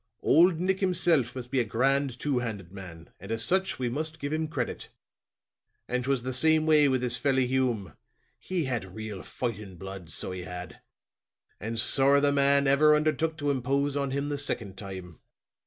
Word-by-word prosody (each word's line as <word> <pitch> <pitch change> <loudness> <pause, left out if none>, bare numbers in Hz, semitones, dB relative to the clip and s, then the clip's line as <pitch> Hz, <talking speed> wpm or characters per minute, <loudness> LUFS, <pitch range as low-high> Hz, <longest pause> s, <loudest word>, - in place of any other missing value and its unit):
Old 170 +1 +4
Nick 190 +1 0
himself 170 - +1
must 125 -1 -7
be 135 - +1
a - - +3
grand, 130 +3 0
two 140 -4 0
handed 100 -7 -6
man, 90 -4 -11
and 95 +4 -9
as 115 0 -1
such 190 +1 0
we 125 - -2
must 155 +6 -3
give 145 +1 -4
him 155 0 -1
credit. 135 -6 -4 1.0
And 125 0 -1
'twas 135 -2 0
the 130 +1 -3
same 155 +4 +4
way 155 -2 +5
with 130 -1 +1
this 125 0 +3
felly 130 -1 +1
Hume. 125 -7 -1 0.5
He 185 -3 -2
had 115 -8 -4
real 110 -3 -6
fighting 105 -6 -5
blood, 95 -1 -9
so 80 - -4
he 90 0 -5
had; 90 0 -8 0.8
and 115 +2 -3
sorra 140 +4 +4
the 145 0 +3
man 140 0 +4
ever 150 +3 +5
undertook 155 +1 0
to 145 -1 0
impose 140 +2 -1
on 140 -1 -1
him 140 +2 -2
the 145 -1 -2
second 115 -8 -3
time." 95 -4 -9
130 Hz, 185 wpm, -27 LUFS, 110-145 Hz, 1.0 s, way